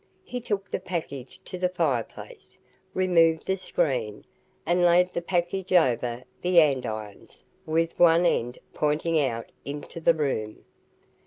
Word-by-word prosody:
He 250 0 -6
took 200 -4 -3
the - - -1
package 170 -6 -6
to 185 - -7
the 180 0 +1
fireplace, 155 -10 -3 0.4
removed 165 -3 +3
the 190 - +1
screen, 135 - -2 0.4
and 175 +2 +2
laid 180 +1 +4
the 170 - -2
package 175 +2 -1
over 125 -7 +2 0.2
the 180 -1 +5
andirons 120 -9 -1 0.2
with 165 +1 0
one 170 0 +6
end 125 -7 0 0.2
pointing 155 +2 +1
out 115 -5 -2
into 145 +3 -7
the 165 +1 +4
room. 130 -8 -3
165 Hz, 135 wpm, -26 LUFS, 130-180 Hz, 0.4 s, one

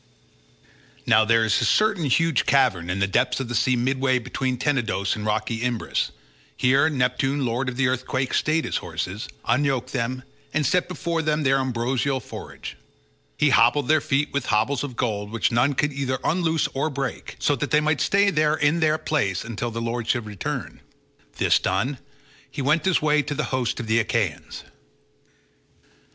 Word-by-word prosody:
Now 110 0 +5
there 115 0 +3
is 110 - +2
a - - +2
certain 200 - +2
huge 160 +2 +2
cavern 120 -11 +2
in 90 - -1
the 100 - +2
depths 125 +8 +1
of 130 -3 -4
the - - -3
sea 125 +2 +2
midway 130 +1 +1
between 130 +1 -2
Tenedos 115 -8 0
and 105 -1 -5
rocky 110 +2 -1
Imbrus; 120 -2 -1 0.5
here 135 +5 +3
Neptune 135 0 0
lord 125 +2 -1
of 125 - -7
the 135 -1 +2
earthquake 130 +1 -2
stayed 155 +1 +1
his - - -1
horses, 90 +7 -5 0.2
unyoked 135 -1 0
them, 130 0 -2 0.3
and 155 -1 +1
set 180 +7 +2
before 170 -2 -2
them 155 -1 0
their 135 0 +3
ambrosial 130 +1 -1
forage. 115 - -9 0.6
He 150 -1 +3
hobbled 125 +3 +4
their 155 0 +4
feet 140 +2 0
with 140 -2 -2
hobbles 120 +6 +1
of 135 -4 -6
gold 105 -4 -2
which 115 +3 0
none 125 +4 +2
could 145 +2 0
either 135 -1 -2
unloose 165 -2 +1
or 140 +4 -1
break, 140 -2 -5
so 145 - +1
that 145 - -3
they 150 - +4
might 150 -1 0
stay 200 0 +3
there 155 -2 +2
in 155 +2 +1
that 155 -1 +1
place 100 - 0
until 115 +1 -4
their 115 0 -4
lord 115 0 -3
should 120 -3 0
return. 105 -4 -5 0.6
This - - +3
done 120 +9 -1 0.5
he 140 - -5
went 155 +6 +2
his 185 -5 +2
way 150 0 +3
to 145 0 -4
the 150 - -1
host 125 -4 -1
of 115 - -4
the 110 +1 +2
Achaeans. 105 -7 -2
130 Hz, 180 wpm, -24 LUFS, 115-145 Hz, 0.6 s, Now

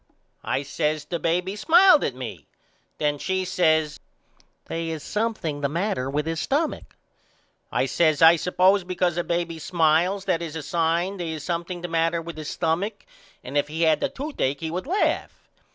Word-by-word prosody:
I 135 - -1
says 150 +1 -2
The 170 - -3
baby 180 +4 0
smiled 340 - +6
at 130 - -2
me. 115 - -8 0.5
Then 145 -1 0
she 190 +2 -1
says 160 -4 +1 0.7
They 165 0 -4
is 160 -2 -5
something 210 -9 -2
the 140 - 0
matter 165 -5 -1
with 150 +2 -1
his 165 0 -2
stumach. 300 +4 -2 0.8
I - - +1
says 155 -3 +2
I 165 +1 +8
suppose 185 +3 +3
because 180 -1 -1
a 175 - -1
baby 170 -1 -2
smiles 170 +4 +1
that 180 -3 0
is 165 -2 -5
a 160 - -4
sign 170 +4 0
they 175 -2 -4
is 155 -2 -5
something 175 +2 -3
the 175 - -4
matter 165 0 +1
with 165 0 -8
his 155 -1 -5
stumach 180 +6 -2 0.4
and 130 - -8
if 145 0 +2
he 160 +3 -2
had 160 -2 +4
the - - 0
toothacke 260 - -3
he 160 -1 -3
would 180 +8 -4
laugh. 380 +6 -1
165 Hz, 180 wpm, -24 LUFS, 155-185 Hz, 0.8 s, I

